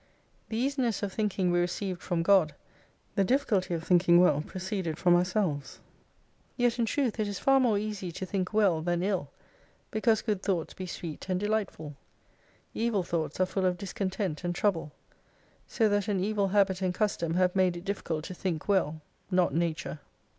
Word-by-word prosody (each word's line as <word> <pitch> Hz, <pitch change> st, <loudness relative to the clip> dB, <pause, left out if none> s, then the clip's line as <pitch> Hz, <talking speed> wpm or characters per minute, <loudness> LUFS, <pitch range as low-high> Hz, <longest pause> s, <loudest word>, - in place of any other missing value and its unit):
The 220 Hz, -, -3 dB
easiness 255 Hz, -4 st, 0 dB
of 195 Hz, -2 st, -2 dB
thinking 200 Hz, -4 st, 0 dB
we 175 Hz, -, +2 dB
received 180 Hz, +1 st, -2 dB
from 175 Hz, -2 st, -1 dB
God, 180 Hz, -5 st, +4 dB, 0.6 s
the 200 Hz, -, +2 dB
difficulty 195 Hz, -7 st, +1 dB
of 165 Hz, -, -4 dB
thinking 175 Hz, 0 st, +5 dB
well 150 Hz, -5 st, +4 dB
proceeded 185 Hz, -2 st, -4 dB
from 175 Hz, -1 st, +4 dB
ourselves. 175 Hz, -5 st, 0 dB, 0.8 s
Yet 245 Hz, -1 st, +1 dB
in 230 Hz, -, +2 dB
truth, 245 Hz, -3 st, 0 dB
it 215 Hz, -, +1 dB
is 205 Hz, -1 st, -4 dB
far 270 Hz, +5 st, +4 dB
more 235 Hz, -5 st, +3 dB
easy 205 Hz, -3 st, -3 dB
to 190 Hz, -, -4 dB
think 185 Hz, 0 st, -2 dB
well 200 Hz, -7 st, +3 dB
than 175 Hz, +1 st, 0 dB
ill, 185 Hz, -8 st, -1 dB, 0.6 s
because 220 Hz, 0 st, +2 dB
good 210 Hz, -4 st, -1 dB
thoughts 180 Hz, -6 st, -1 dB
be 185 Hz, -, -6 dB
sweet 170 Hz, 0 st, -7 dB
and 185 Hz, -1 st, +1 dB
delightful: 205 Hz, -8 st, -2 dB, 0.8 s
Evil 225 Hz, -4 st, 0 dB
thoughts 165 Hz, -2 st, -3 dB
are 185 Hz, -, +4 dB
full 185 Hz, 0 st, 0 dB
of 180 Hz, -1 st, 0 dB
discontent 190 Hz, -3 st, -3 dB
and 175 Hz, 0 st, -2 dB
trouble. 170 Hz, -6 st, 0 dB, 0.8 s
So 225 Hz, -, +2 dB
that 205 Hz, 0 st, +1 dB
an 200 Hz, -3 st, 0 dB
evil 200 Hz, +1 st, +1 dB
habit 195 Hz, -1 st, +2 dB
and 180 Hz, -1 st, 0 dB
custom 170 Hz, -6 st, 0 dB
have 180 Hz, 0 st, +2 dB
made 185 Hz, -2 st, +2 dB
it 175 Hz, -, -9 dB
difficult 170 Hz, -6 st, -3 dB
to -, -, -6 dB
think 180 Hz, -4 st, -3 dB
well, 160 Hz, -6 st, +1 dB, 0.3 s
not 180 Hz, -5 st, +2 dB
Nature. 160 Hz, -1 st, -2 dB
185 Hz, 175 wpm, -29 LUFS, 175-210 Hz, 0.8 s, thinking